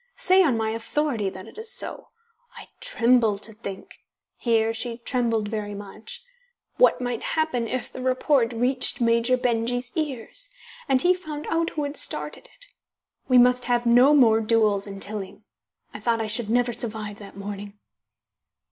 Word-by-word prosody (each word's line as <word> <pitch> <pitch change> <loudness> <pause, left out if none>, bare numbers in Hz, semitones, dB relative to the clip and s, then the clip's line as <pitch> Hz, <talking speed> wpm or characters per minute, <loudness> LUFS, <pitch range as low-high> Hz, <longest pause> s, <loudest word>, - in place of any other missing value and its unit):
Say 380 -6 +4
on 280 -10 +2
my 220 0 -1
authority 230 -1 -1
that 185 0 -10
it - - -12
is 445 +1 -2
so. - - -1 0.5
I - - -9
tremble 240 - +2
to 220 +2 -8
think" 200 -3 -9 0.4
here 225 -2 +1
she 230 +1 -4
trembled 235 -3 -1
very 205 -2 -4
much 210 - -9 0.5
"what - - +4
might 245 -2 -3 0.2
happen 260 -7 0
if 255 +2 -4
the 255 - -7
report 255 -1 +2
reached 250 +3 +4
Major 235 +1 +3
Benjy's 245 0 -1
ears, 310 - -2 0.4
and 260 -1 +3
he 360 +1 +5
found 310 -5 -7
out 330 +1 +1
who 300 - 0
had 285 +1 -4
started - - -3
it. - - -13 0.6
We 255 - +4
must 250 0 +4
have 240 -1 +1
no 250 +5 +6
more 225 -5 +5
duels 215 -3 +2
in 195 -1 -8
Tilling. 200 0 -6 0.5
I - - -7
thought 230 -1 0
I 225 - -1
should 215 0 -1
never 240 +1 +1
survive 215 -3 -3
that 200 -2 -12
morning." 200 0 -7
235 Hz, 165 wpm, -24 LUFS, 220-260 Hz, 0.6 s, no